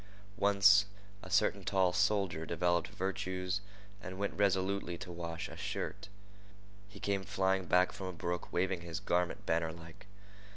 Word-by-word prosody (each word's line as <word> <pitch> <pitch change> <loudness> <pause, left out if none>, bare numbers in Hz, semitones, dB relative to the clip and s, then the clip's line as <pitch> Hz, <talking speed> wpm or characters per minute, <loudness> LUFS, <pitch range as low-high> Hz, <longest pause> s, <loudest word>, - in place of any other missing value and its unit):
Once 100 0 +6 0.4
a 95 - -10
certain 100 +1 +2
tall 95 -1 +2
soldier 95 -3 +1
developed 85 +1 +1
virtues 95 0 -2 0.4
and 95 +1 -7
went 100 +1 -1
resolutely 95 -2 +1
to 90 - -8
wash 85 -1 -5
a - - -10
shirt. - - -4 0.8
He - - -12
came 100 -1 -1
flying 95 -1 +1
back 90 +3 +4
from 95 - -6
a - - -3
brook 85 +1 -4
waving 90 0 0
his 85 -1 -5
garment 90 0 0
bannerlike. 85 +3 -3
95 Hz, 140 wpm, -34 LUFS, 85-100 Hz, 0.8 s, Once